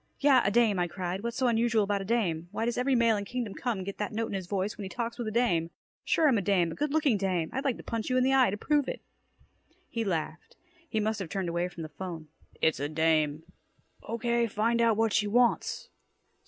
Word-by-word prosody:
"Yeah, 275 -3 +5
a - - +2
dame," 215 -3 +3
I 175 - +1
cried. 185 +1 -4
"What's 235 +1 -4
so 260 - +1
unusual 230 -2 +2
about 200 0 -1
a - - -5
dame? 180 -7 0
Why 225 - -2
does 240 - -1
every 255 +2 +1
male 230 -2 +4
in 205 - -3
Kingdom 230 -1 -4
Come 230 -7 -3
get 200 +1 -7
that 210 - -2
note 225 +1 -2
in - - -5
his 190 -3 -4
voice 195 +1 -2
when - - -9
he 195 - -5
talks 235 +2 -4
with 235 - -3
a - - -2
dame? 180 -8 +1 0.3
Sure 320 - +3
I'm 245 -7 +4
a - - -2
dame, 180 -4 +2
a - - -4
good 295 - -2
looking 290 -7 +2
dame! 185 -4 -1
I'd 265 - -2
like 265 -4 +1
to - - -11
punch 230 0 -3
you 255 - +2
in 255 - +3
the 265 +1 +3
eye 260 -4 +5
to 200 - -3
prove 290 +4 +1
it!" - - -6 0.8
He 230 - -3
laughed. 165 -5 -3 0.3
He 220 - 0
must 215 0 -1
have 185 -4 -5
turned 190 -1 -2
away 170 +1 -1
from 175 -2 -8
the 155 - -7
'phone. 160 0 -7 0.3
"It's 160 -3 +3
a 145 +1 -2
dame." 155 -1 +1 0.7
"Okay, 235 +1 +1
find 230 +3 +1
out 230 -2 +3
what 225 -1 +2
she 210 - +2
wants." 240 +3 +1
210 Hz, 250 wpm, -29 LUFS, 180-235 Hz, 0.8 s, Yeah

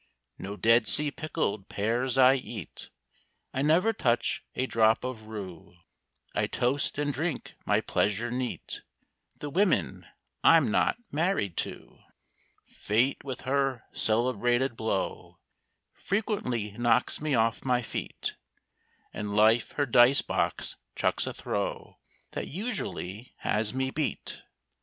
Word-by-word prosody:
No 100 +2 -6
Dead 115 0 +4
Sea 150 +4 +4
pickled 140 -11 -3
pears 120 +5 0
I 130 0 +7
eat; 120 - -6 0.6
I 130 - -1
never 170 +10 +3
touch 120 - +1
a 130 - 0
drop 110 -3 +3
of 120 -4 -5
rue; 95 -6 -8 0.6
I - - +1
toast, 135 +4 +1
and 145 0 0
drink 155 +2 -3
my - - +3
pleasure 110 +4 0
neat, 125 0 -4 0.6
The 145 - -6
women 195 +5 +1 0.4
I'm - - +6
not - - +2
married 150 - 0
to! - - -5 0.7
Fate 115 +6 0
with 130 -3 -5
her 135 -2 0
celebrated 120 +2 +1
blow 95 -5 -3 0.6
Frequently 185 - -2
knocks 120 +5 +1
me 150 -3 +1
off 115 -1 +1
my 125 -2 +1
feet; - - -4 0.8
And 105 -1 -4
Life 110 +2 +4
her 145 - +1
dice 125 +2 +6
box - - -1 0.2
chucks - - +1
a - - -3
throw - - -4 0.3
That - - -4
usually 140 - -5
has 105 0 +1
me 130 0 0
beat. 150 0 -3
125 Hz, 125 wpm, -28 LUFS, 110-140 Hz, 0.8 s, I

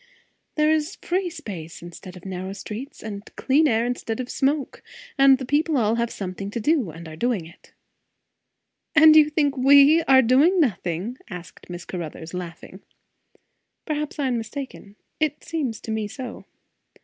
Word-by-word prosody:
"It 305 0 +4
is 315 +3 +1
free 365 +1 -1
space 195 - -8
instead 180 +1 -10
of 180 - -14
narrow 190 0 -5
streets, 220 +8 -8
and 205 -2 -6
clear 295 +3 +3
air 225 0 +2
instead 245 -2 -3
of 250 -1 -4
smoke. 280 0 -1 0.3
And 270 -1 +6
the 260 - -6
people 300 +3 +1
all 220 -3 +2
have 235 0 0
something 195 -1 -5
to 235 - -4
do, 270 - +1
and 165 +1 -10
are 155 - -9
doing 220 -2 -1
it." 170 - -17 1.2
"And 310 0 +8
you 305 -1 +7
think 290 -2 +1
we 280 +4 +6
are 265 -1 +7
doing 285 +11 +4
nothing?" 205 - -1
asked 180 -2 -10
Miss 175 0 -7
Caruthers, 165 -1 -7
laughing. 180 +1 -8 1.0
"Perhaps 300 -1 -3
I 285 - -1
am 240 -2 0
mistaken. 225 -3 -8 0.2
It 305 -1 -1
seems 275 -10 -3
to 220 - -6
me 220 -1 -1
so." 240 +3 -8
245 Hz, 160 wpm, -24 LUFS, 190-290 Hz, 1.2 s, And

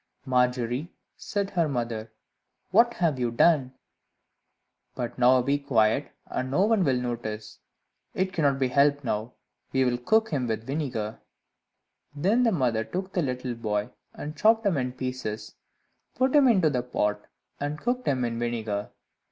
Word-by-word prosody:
"Margery," 125 +3 0 0.2
said 200 -1 -3
her 170 -4 +1
mother, 115 -4 -3 0.6
"what 235 +4 +5
have 160 -7 +1
you 120 -1 +1
done! 130 +1 +3 1.2
but 120 0 -4
now 125 0 +5
be 140 +3 +1
quiet, 115 -6 +1
and 130 - -3
no 180 +9 +3
one 220 -3 +3
will 130 -5 +2
notice; 110 -3 -5 0.6
it 190 0 0
cannot 140 -5 +2
be 130 -2 +1
helped 145 +1 +3
now 110 -1 -2 0.4
we 130 -1 +2
will 120 -1 0
cook 220 - +2
him 130 -5 -1
in 110 -1 -1
vinegar." 125 -5 -3 1.0
Then 195 +12 +2
the 235 -2 +4
mother 125 - +1
took 185 - -5
the 180 - +1
little 125 -3 -2
boy, 110 0 -2 0.2
and 150 +1 -7
chopped 220 +5 +3
him 195 -4 +3
in 125 -1 -2
pieces, 125 -5 -5 0.6
put 260 +3 +2
him 285 -3 +7
into 185 -10 +4
the 125 -3 0
pot, 105 -4 -2 0.3
and 145 +1 -3
cooked 250 +4 -2
him 130 -3 +1
in 115 -1 -3
vinegar. 110 -4 -2
130 Hz, 155 wpm, -27 LUFS, 120-170 Hz, 1.2 s, him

